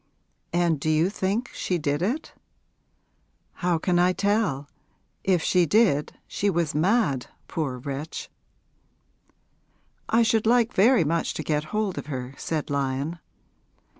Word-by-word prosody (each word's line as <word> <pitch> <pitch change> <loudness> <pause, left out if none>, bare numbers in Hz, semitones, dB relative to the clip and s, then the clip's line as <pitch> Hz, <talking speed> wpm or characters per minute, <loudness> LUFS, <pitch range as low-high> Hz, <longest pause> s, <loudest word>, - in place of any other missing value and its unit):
'And 170 -3 +1
do 155 - -1
you 160 +4 +2
think 210 +5 -1
she 180 - -1
did 145 -1 -1
it?' 250 - -2 1.2
'How 175 -2 0
can 175 +2 +1
I 180 +1 +4
tell? 200 -9 0 0.6
If 180 -4 +2
she 180 -2 +3
did 185 -6 +3
she 205 - 0
was 170 -4 0
mad, 155 - +1 0.2
poor 145 -6 -3
wretch.' 140 +4 -5 1.8
'I 230 +1 +4
should 220 0 +2
like 240 0 +3
very 225 +1 +5
much 165 +2 -1
to - - -3
get 150 -1 -1
hold 210 +1 -2
of - - -8
her,' 130 -2 -5
said 155 -1 -3
Lyon. 140 +4 -1
170 Hz, 135 wpm, -25 LUFS, 150-205 Hz, 1.8 s, very